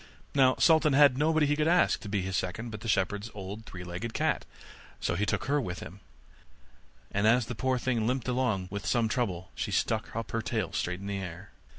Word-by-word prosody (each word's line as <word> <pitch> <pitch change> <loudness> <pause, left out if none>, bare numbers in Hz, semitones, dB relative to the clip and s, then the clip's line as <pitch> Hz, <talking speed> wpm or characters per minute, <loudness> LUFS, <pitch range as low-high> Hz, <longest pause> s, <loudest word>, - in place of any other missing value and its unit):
Now 130 -2 +5
Sultan 160 -3 +5
had 140 -2 +6
nobody 155 +2 +3
he 145 +1 +2
could 155 +1 +1
ask 175 +2 +4
to 105 - -8
be 100 -2 0
his 95 0 -3
second 100 +6 -3
but 105 -1 -7
the 115 - -6
shepherd's 105 +1 0
old 100 +2 -7
three 90 -1 -8
legged 90 +6 -5
cat; - - 0 0.5
so - - -1
he 100 +4 0
took - - 0
her 145 +2 +2
with 90 -6 -4
him, 100 - -9 1.1
and 100 +2 +2
as 120 +1 +4
the 125 - -5
poor 130 +2 0
thing 120 -3 0
limped 125 -1 -1
along 125 -7 0
with 100 0 -4
some 115 -2 +2
trouble, 95 -7 -2
she - - -3
stuck 110 -1 -1
up 115 0 -4
her 115 - -1
tail - - -2
straight 90 +2 -2
in - - -7
the 100 -1 -3
air. 90 0 -8
110 Hz, 220 wpm, -29 LUFS, 95-130 Hz, 1.1 s, had